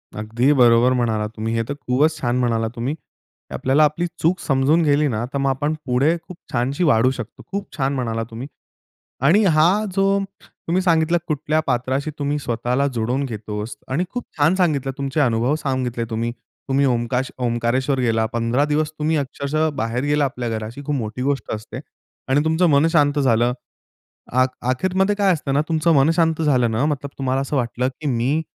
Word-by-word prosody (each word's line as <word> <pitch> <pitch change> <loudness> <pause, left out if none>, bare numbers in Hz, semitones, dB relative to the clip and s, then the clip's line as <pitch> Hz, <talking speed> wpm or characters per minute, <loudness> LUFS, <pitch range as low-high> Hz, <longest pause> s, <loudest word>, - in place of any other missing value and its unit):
अगदी 115 +6 +1
बरोबर 120 -1 +5
म्हणालात 110 -4 0
तुम्ही. 110 +1 -3
हे 115 - +1
तर - - -1
खूपच 150 +6 +1
छान 120 -1 0
म्हणालात 115 -2 0
तुम्ही. 130 +5 -2 0.6
आपल्याला 135 +4 +2
आपली 155 +4 -1 0.2
चूक 175 +3 +2
समजून 140 +4 +2
गेली 150 0 +3
ना, 115 -3 -2
तर - - 0
मग 135 0 +1
आपण 145 +3 0
पुढे 135 +6 +2
खूप 180 - -10
छानशी 130 +7 0
वाढू 130 -5 +4
शकतो. 125 -4 -8
खूप 200 0 -3
छान 135 -1 0
म्हणालात 115 -4 -2
तुम्ही. 120 +3 -7 0.7
आणि 170 - +4
हा 175 +4 +3
जो 195 0 +2 0.2
तुम्ही 180 +3 -3
सांगितला 170 -1 +3
कुठल्या 155 +1 0
पात्राशी 130 +3 -1
तुम्ही 145 0 -1
स्वतःला 125 +1 -1
जोडून 120 +4 -1
घेतोस 105 -2 -5
आणि 150 +7 0
खूप 245 -1 -4
छान 155 +4 +4
सांगितलं 150 -8 +1
तुमचे 140 +2 -1
अनुभव 120 0 +2
सांगितले 130 -4 -1
तुम्ही. 115 +1 -2 0.4
तुम्ही 135 +1 +2
ओंकाश 125 +1 0
ओंकारेश्वर 125 +3 0
गेला 115 -2 +1
15 115 +4 +1
दिवस 150 +1 0
तुम्ही 155 +1 +1
अक्षरशः 145 +2 -1
बाहेर 125 0 -2
गेला 145 0 +2
आपल्या 125 -3 -3
घराशी 110 +4 -5
खूप 150 - 0
मोठी 110 0 -4
गोष्ट 140 +1 -1
असते 110 +2 -6 0.5
आणि 135 +2 +3
तुमचं 160 +3 +2
मन 145 +2 +4
शांत 145 -3 +3
झालं. 120 -3 +3 0.8
अ 130 +1 +4 0.2
अखेरमध्ये 185 +9 +1
काय 200 -2 +3
असतं 145 -4 -3
ना 145 - +3
तुमचं 165 +1 +2
मन 135 +2 +4
शांत 165 -1 +2
झालं 130 -7 +2
ना 115 +6 +1
मतलब 145 -2 -2
तुम्हाला 135 0 0
असं 140 +2 -3
वाटलं 125 0 -1
की 150 - -3
मी 130 +4 +1
135 Hz, 175 wpm, -21 LUFS, 120-155 Hz, 0.8 s, बरोबर